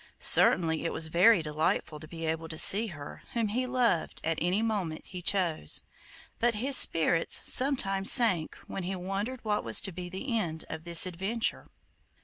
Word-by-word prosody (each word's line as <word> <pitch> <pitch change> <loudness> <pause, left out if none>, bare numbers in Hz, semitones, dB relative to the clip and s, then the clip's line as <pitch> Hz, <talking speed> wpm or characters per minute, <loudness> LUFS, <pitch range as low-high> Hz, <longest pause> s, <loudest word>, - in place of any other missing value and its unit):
Certainly 160 -2 +4
it 165 - -3
was 160 0 -1
very 180 +2 +3
delightful 155 0 -3
to 155 - -11
be 165 0 -8
able 160 0 -4
to 160 -1 -7
see 210 +7 +5
her 145 -7 -11
whom 230 -3 -2
he 250 +4 -3
loved 245 -9 -2
at 165 0 -3
any 180 +6 -1
moment 195 -8 -4
he 180 -1 -10
chose, 175 - 0 0.6
but 235 -1 0
his 260 +6 +1
spirits 165 -5 +3
sometimes 195 -8 +2
sank 190 -11 +4
when 195 - -7
he 185 +2 -5
wondered 200 +7 -6
what 210 -1 -2
was - - +5
to 195 - -4
be 180 0 -9
the 195 +7 -6
end 160 -7 -4
of 160 - -9
this 170 0 +5
adventure. 195 +6 -4
185 Hz, 175 wpm, -27 LUFS, 165-220 Hz, 0.6 s, see